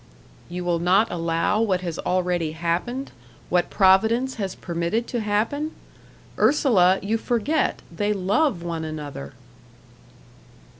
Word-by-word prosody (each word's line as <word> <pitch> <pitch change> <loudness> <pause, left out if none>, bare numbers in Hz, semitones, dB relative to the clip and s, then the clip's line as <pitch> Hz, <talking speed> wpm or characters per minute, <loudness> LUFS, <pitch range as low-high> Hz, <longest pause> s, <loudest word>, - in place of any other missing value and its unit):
"You 180 +1 -4
will 175 -1 +1
not 190 +6 +3
allow 165 +5 0
what 190 -5 +1
has 170 -3 -4
already 180 -3 0
happened 175 +11 -2 0.4
what 175 -1 +1
Providence 220 +7 +3
has 190 -2 -3
permitted 170 +7 -2
to 240 - -1
happen? 230 +9 -1 0.7
Ursula, 195 -11 +4
you 220 +3 0
forget 245 +7 0
they 205 +3 0
love 205 - +1
one 165 -2 -3
another." 145 - -7
190 Hz, 115 wpm, -24 LUFS, 170-225 Hz, 0.7 s, Ursula